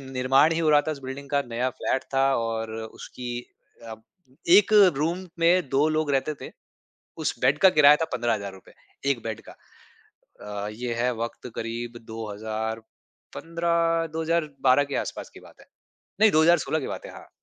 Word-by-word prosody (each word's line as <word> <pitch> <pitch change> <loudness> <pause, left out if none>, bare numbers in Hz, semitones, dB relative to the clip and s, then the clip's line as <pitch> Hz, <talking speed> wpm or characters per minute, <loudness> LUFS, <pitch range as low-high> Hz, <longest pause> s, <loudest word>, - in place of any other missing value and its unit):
निर्माण 135 +3 +2
ही 165 - -1
हो 155 -2 +2
रहा 145 -1 +6
था - - 0
इस 145 - -8
बिल्डिंग 135 +1 -7
का, 140 -1 +2
नया 125 +2 -1
फ्लैट 130 - -1
था 135 0 +3
और 115 -1 -3 0.2
उसकी 120 -1 -7 0.5
अ, 110 - -6 0.6
एक 210 +1 +1 0.2
रूम 170 +5 -2
में 170 -2 +3
2 140 +3 +3
लोग 155 -1 0
रहते 140 +3 0
थे। - - -7 0.7
उस - - -2
बेड 145 - +3
का 190 - +7
किराया 150 -1 +7
था 160 - -1
₹15000, 100 -6 -3 0.4
एक 120 -4 -4
बेड 110 -2 -5
का। - - -11 1.1
अ, 105 - -3
ये 120 +2 -4
है 125 0 +1
वक़्त 115 +2 -6
करीब 120 +1 -5
2015 115 +10 -3
2012 150 -5 +1
के 140 - -4
आसपास - - -6
की - - -12
बात - - -18
है। - - -18 0.6
नहीं, 220 -2 +7
2016 160 0 +3
की 135 - -5
बात - - -6
है, - - -9
हाँ। - - -13
135 Hz, 165 wpm, -25 LUFS, 115-160 Hz, 1.1 s, का